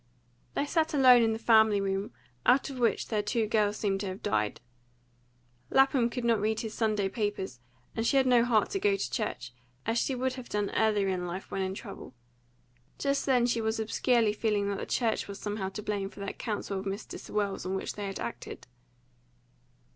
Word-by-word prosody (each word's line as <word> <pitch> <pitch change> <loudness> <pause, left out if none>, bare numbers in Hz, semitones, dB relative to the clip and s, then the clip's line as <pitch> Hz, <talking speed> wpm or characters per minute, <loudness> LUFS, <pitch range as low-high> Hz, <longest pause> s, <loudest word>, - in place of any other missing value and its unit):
They 285 - +1
sat 320 +1 0
alone 255 -3 +7
in 225 -1 +3
the 220 - -1
family 220 -2 +5
room, 195 0 -2 0.3
out 270 +2 +3
of 260 - -7
which 235 -2 +1
their 215 -2 +1
two 215 +2 0
girls 210 -1 +1
seemed 195 -2 0
to 200 - -3
have 185 +1 -6
died. 105 -1 0 1.1
Lapham 270 -3 +4
could 245 0 -4
not 230 -3 +3
read 220 +1 0
his 220 -2 -5
Sunday 215 -3 +1
papers, 200 - -3 0.4
and 225 - -1
she 255 +4 +2
had 265 - +4
no 245 -2 +5
heart 225 -4 +2
to 195 - -1
go 200 +1 +3
to 130 -10 -3
church, 125 -1 -3 0.3
as 225 +1 +1
she 265 - 0
would 260 +1 -1
have 255 -2 -9
done 205 -1 -1
earlier 210 -3 +2
in 180 -1 -2
life 180 +3 -6
when 195 - -2
in 190 0 -2
trouble. 130 - -9 0.8
Just 280 0 0
then 250 -3 +4
she 235 -1 +1
was 220 0 -1
obscurely 225 0 +2
feeling 210 -2 0
that 200 - -2
the - - -5
church 230 -3 0
was 200 -1 -7
somehow 205 -2 -3
to 210 +2 -7
blame 200 -2 -2
for - - -14
that 200 0 -5
counsel 205 -3 -3
of 190 - -7
Mr. 195 +3 -5
Sewell's 205 -2 -2
on 190 +1 -2
which 190 - -3
they 205 -1 -5
had 195 - -5
acted. 120 0 -6
210 Hz, 205 wpm, -29 LUFS, 195-235 Hz, 1.1 s, alone